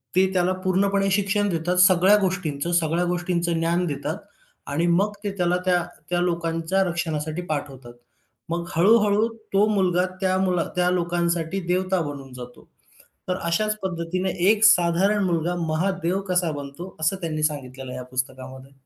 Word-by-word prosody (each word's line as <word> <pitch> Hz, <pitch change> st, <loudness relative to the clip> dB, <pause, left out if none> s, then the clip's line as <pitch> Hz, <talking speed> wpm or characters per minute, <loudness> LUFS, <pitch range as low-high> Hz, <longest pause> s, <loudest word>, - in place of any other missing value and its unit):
ते 190 Hz, 0 st, +3 dB
त्याला 180 Hz, 0 st, +2 dB
पूर्णपणे 195 Hz, +1 st, +1 dB
शिक्षण 205 Hz, +1 st, +1 dB
देतात 175 Hz, +1 st, -1 dB
सगळ्या 185 Hz, +3 st, +5 dB
गोष्टींचं, 175 Hz, -4 st, -2 dB
सगळ्या 170 Hz, +1 st, +1 dB
गोष्टींचं 175 Hz, -1 st, -1 dB
ज्ञान 170 Hz, +2 st, +1 dB
देतात 145 Hz, +4 st, -3 dB, 0.5 s
आणि 165 Hz, +4 st, +1 dB
मग 195 Hz, +5 st, +2 dB
ते 205 Hz, -, -2 dB
त्याला 180 Hz, 0 st, +1 dB
त्या, 180 Hz, -1 st, +2 dB, 0.3 s
त्या 175 Hz, 0 st, +1 dB
लोकांच्या 170 Hz, +2 st, 0 dB
रक्षणासाठी 160 Hz, -2 st, -3 dB
पाठवतात. 135 Hz, -5 st, -5 dB, 0.6 s
मग 170 Hz, 0 st, -2 dB
हळू-हळू 210 Hz, +4 st, +4 dB, 0.3 s
तो 200 Hz, +2 st, +5 dB
मुलगा 180 Hz, -2 st, +2 dB, 0.2 s
त्या 185 Hz, 0 st, +2 dB
मुला 180 Hz, -3 st, +1 dB
त्या 180 Hz, 0 st, +2 dB
लोकांसाठी 175 Hz, 0 st, -1 dB
देवता 185 Hz, 0 st, +1 dB
बनून 140 Hz, -3 st, -7 dB
जातो. 125 Hz, -1 st, -11 dB, 0.6 s
तर 180 Hz, -, 0 dB
अशाच 215 Hz, +5 st, 0 dB
पद्धतीनं 185 Hz, 0 st, -2 dB, 0.2 s
एक 215 Hz, 0 st, +3 dB
साधारण 195 Hz, +1 st, +4 dB
मुलगा 175 Hz, 0 st, 0 dB
महादेव 180 Hz, +3 st, -1 dB
कसा 180 Hz, -2 st, +1 dB
बनतो, 145 Hz, +6 st, -8 dB
असं 160 Hz, +5 st, +1 dB
त्यांनी 155 Hz, -2 st, -3 dB
सांगितलेलं 135 Hz, -4 st, -3 dB
आहे 130 Hz, -, -6 dB
या 125 Hz, -, -6 dB
पुस्तकामध्ये. 130 Hz, +1 st, -5 dB
175 Hz, 145 wpm, -24 LUFS, 160-190 Hz, 0.6 s, सगळ्या